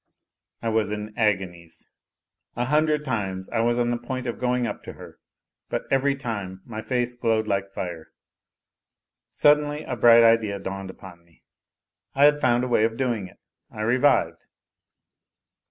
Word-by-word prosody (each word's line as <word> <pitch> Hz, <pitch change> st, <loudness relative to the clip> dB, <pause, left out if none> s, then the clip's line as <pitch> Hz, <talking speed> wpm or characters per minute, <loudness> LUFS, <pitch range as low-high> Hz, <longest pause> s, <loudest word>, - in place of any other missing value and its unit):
I 115 Hz, -, 0 dB
was 110 Hz, -2 st, +1 dB
in 105 Hz, 0 st, -5 dB
agonies. 95 Hz, -6 st, -2 dB, 0.7 s
A 120 Hz, -, -1 dB
hundred 150 Hz, +2 st, +1 dB
times 95 Hz, -7 st, -3 dB
I 115 Hz, -, -1 dB
was 120 Hz, +1 st, +2 dB
on 120 Hz, 0 st, +1 dB
the 120 Hz, -, -1 dB
point 130 Hz, +1 st, -5 dB
of 120 Hz, -4 st, -4 dB
going 125 Hz, -1 st, 0 dB
up -, -, -5 dB
to -, -, -7 dB
her, -, -, -13 dB, 0.5 s
but -, -, -2 dB
every 135 Hz, +1 st, +2 dB
time 100 Hz, -8 st, -6 dB
my 110 Hz, -2 st, -6 dB
face 125 Hz, +2 st, -1 dB
glowed 115 Hz, -2 st, 0 dB
like 100 Hz, -1 st, -1 dB
fire. 85 Hz, -4 st, -6 dB, 1.2 s
Suddenly 150 Hz, 0 st, +2 dB
a 125 Hz, -, -4 dB
bright 115 Hz, 0 st, +7 dB
idea 115 Hz, -3 st, +3 dB
dawned 95 Hz, 0 st, -6 dB
upon 90 Hz, -2 st, -12 dB
me. 85 Hz, -1 st, -29 dB, 0.7 s
I 140 Hz, +1 st, +5 dB
had 150 Hz, 0 st, +4 dB
found 120 Hz, -1 st, +2 dB
a -, -, -1 dB
way 120 Hz, -3 st, +2 dB
of 115 Hz, 0 st, 0 dB
doing 120 Hz, -7 st, -1 dB
it; -, -, -19 dB, 0.3 s
I 105 Hz, -, -8 dB
revived. 115 Hz, -, +2 dB
115 Hz, 160 wpm, -24 LUFS, 100-125 Hz, 1.2 s, bright